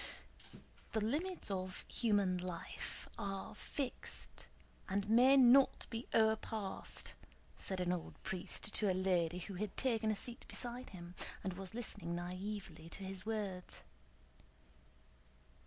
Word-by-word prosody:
"The 220 - +2
limits 320 - 0
of 185 -1 -3
human 200 -5 +3
life... 180 -1 -5
are 195 -1 -3
fixed 270 -3 -3 0.4
and 200 +1 +1
may 250 +5 +7
not 260 +1 +7
be 230 +1 -3
o'erpassed," 220 -2 +1 0.4
said 190 -1 -3
an 180 -1 +2
old 175 -2 -3
priest 190 +2 -2
to 205 -3 +4
a - - +1
lady 180 -2 +2
who 180 +3 -5
had 200 +1 -3
taken 225 -4 +2
a 215 - +3
seat 240 +3 -2
beside 245 +1 -3
him 175 -2 -8 0.3
and 190 - -1
was 190 +2 -5
listening 205 -7 -2
naïvely 180 -1 -4
to 195 - -7
his 190 +1 -5
words. 200 -5 -3
200 Hz, 125 wpm, -38 LUFS, 185-225 Hz, 0.4 s, may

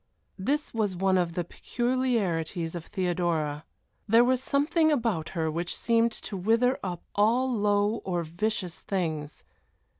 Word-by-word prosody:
This 290 +10 -1
was 210 -4 0
one 190 +1 +2
of 175 -2 +1
the 175 0 -1
peculiarities 195 -8 -1
of 170 -2 -6
Theodora. 170 -5 -1 0.4
There 225 +3 +6
was 255 0 +2
something 315 +4 +2
about 225 - 0
her 160 -1 0
which 170 +2 -3
seemed 230 0 +2
to 210 - -7
wither 230 +7 +2
up 180 -3 -5
all 230 +6 +3
low 205 0 +2
or 175 -2 -1
vicious 180 +2 -2
things. 160 -6 -3
195 Hz, 140 wpm, -28 LUFS, 170-235 Hz, 0.4 s, There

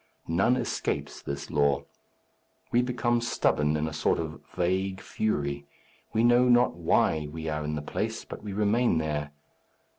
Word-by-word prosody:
None 95 +9 +3
escapes - - -2
this 70 0 -5
law. 70 -1 +2 0.9
We 120 - +4
become 120 -1 0
stubborn 75 -9 +1
in 75 +1 -1
a 80 - -5
sort - - +1
of - - -5
vague 95 +2 0
fury. 70 -9 -2 0.4
We 110 - +2
know 120 +1 +5
not 120 0 +5
why 80 -2 +1
we 80 +1 -6
are 75 0 -2
in 75 +1 -2
the 75 - -4
place, - - -3
but - - -8
we 105 - -5
remain 105 0 +2
there. 75 -2 -2
85 Hz, 155 wpm, -28 LUFS, 75-115 Hz, 0.9 s, know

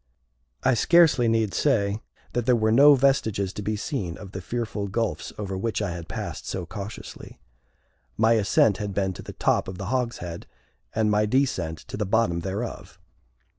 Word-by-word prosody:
I 130 - +4
scarcely 150 -1 +5
need 115 -3 +1
say 105 -7 +1 0.3
that 120 0 -1
there 125 - +5
were 110 -1 +2
no 140 +5 +8
vestiges 110 -8 +1
to 105 - -5
be 105 +2 -1
seen 105 - -3
of 100 -2 -10
the 95 - -6
fearful 110 -1 -3
gulfs 115 +3 -2
over 100 -2 -4
which 110 +4 -2
I 100 -4 -2
had 85 -1 -7
passed - - -6
so 95 -2 -3
cautiously. 105 +3 -8 0.8
My 110 +1 +4
ascent 105 -1 +3
had 105 -3 -4
been 95 -2 0
to - - -9
the - - -9
top - - +1
of 95 -1 -6
the 95 +6 -4
hogshead, 115 -9 -3 0.5
and 110 -1 +2
my 105 0 +2
descent 110 - 0
to - - -6
the 105 - -1
bottom 100 -5 +2
thereof. 100 +7 -5
105 Hz, 175 wpm, -25 LUFS, 95-115 Hz, 0.8 s, no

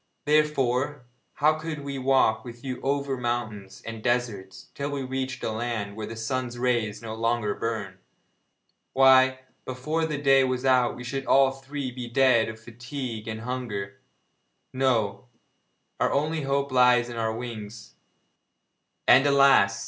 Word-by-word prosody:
Therefore, 145 -3 +1 0.3
how 155 +1 +2
could 155 -2 -5
we 140 -1 -4
walk 130 -4 +2
with 120 -1 -11
you 130 -2 -5
over 140 -1 -1
mountains 110 -5 -4
and 115 -1 -7
deserts, 110 -6 -2
till 140 0 -4
we 140 -2 -3
reached 130 -1 -4
a - - -1
land 110 -3 -3
where 110 -1 -5
the 115 - -7
sun's 120 +2 -3
rays 120 -3 -1
no 110 -1 -5
longer 115 -2 0
burn? 105 -5 -4 0.9
Why, 130 0 +5 0.2
before 155 +6 -2
the 150 -2 -3
day 135 -1 +5
was 130 0 -1
out 125 -2 +3
we 125 - -8
should 135 +2 -4
all 135 -1 +5
three 135 0 -6
be 125 -1 -7
dead 125 -3 +3
of 110 0 -9
fatigue 120 0 -7
and 110 0 -5
hunger! 115 -6 -5 0.7
No, 125 -4 0 0.7
our - - +2
only 155 +3 0
hope 140 0 -1
lies 125 -1 +4
in 120 -1 -7
our 110 -1 0
wings 110 -3 -8 1.1
and, 135 +3 +7
alas! 135 -8 +5
125 Hz, 150 wpm, -26 LUFS, 115-135 Hz, 1.1 s, and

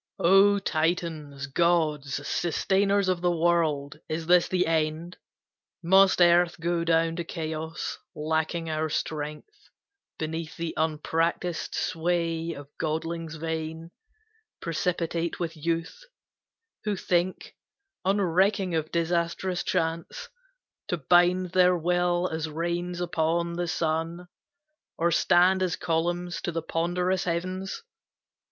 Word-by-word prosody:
"O 195 +3 +5
Titans, 160 -5 -2
gods, 150 -2 +1
sustainers 195 +5 +1
of 185 -2 0
the 175 - +2
world, 160 -4 +1
Is 160 +1 -3
this 175 +1 +5
the 180 -1 +1
end? 160 +2 -1 0.7
Must 190 +2 +5
Earth 175 0 +4
go 170 0 0
down 165 0 +2
to 170 - -2
Chaos, 160 -1 -5 0.2
Lacking 160 +2 -1
our 155 0 -1
strength, 150 - -5 0.5
beneath 160 +1 -4
the 165 -1 -3
unpracticed 160 +2 -1
sway 165 0 -1
Of 145 -1 -12
godlings 165 +1 -3
vain, 160 +1 -4 0.7
precipitate 170 0 -2
with 170 -2 -3
youth, 165 - -3 0.8
Who 210 -1 0
think, 180 0 -1 0.5
unrecking 190 0 +2
of 160 -1 -1
disastrous 170 +2 -1
chance, 165 - -2 0.6
To 175 - -1
bind 175 +3 +3
their 180 -1 +4
will 175 +1 +1
as 160 -2 -3
reins 175 +2 -3
upon 170 0 0
the 175 0 -2
sun, 165 +1 -2 0.7
Or 170 +1 +2
stand 180 +3 +4
as 185 -3 +1
columns 175 +1 -1
to - - -2
the 165 -1 -3
ponderous 180 +3 0
heavens? 185 - -3
170 Hz, 110 wpm, -27 LUFS, 160-180 Hz, 0.8 s, O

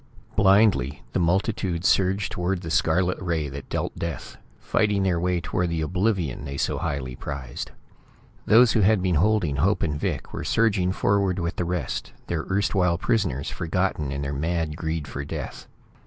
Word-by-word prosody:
Blindly, 95 - +4
the - - +1
multitude 95 0 0
surged 95 +1 +2
towards 90 +1 -1
the 80 -3 -5
scarlet 90 +2 +2
ray 80 -5 -1
that 70 +1 -8
dealt - - -2
death, 85 -6 -5 0.2
fighting 105 -2 +1
their 90 -3 +1
way 90 0 +1
toward 90 +1 -1
the 85 -1 -1
oblivion 90 - 0
they 70 -1 -5
so - - 0
highly 70 -6 -3
prized. 70 0 -6 0.8
Those 115 +2 +7
who - - +2
had 105 -1 +4
been 90 -1 +2
holding 85 -3 +2
Hope 95 +6 +2
and 75 -3 -1
Vic 80 -10 -3
were - - -4
surging 100 -5 +2
forward 100 -1 +1
with 85 -1 -2
the 90 - 0
rest, 85 -6 -3
their 80 -2 -3
erstwhile 95 -3 +2
prisoners 90 - 0
forgotten 85 -4 -1
in 70 +1 -3
their 70 +1 -3
mad 80 +1 -1
greed 80 -2 -3
for 70 - -5
death. - - -6
85 Hz, 170 wpm, -25 LUFS, 75-95 Hz, 0.8 s, Those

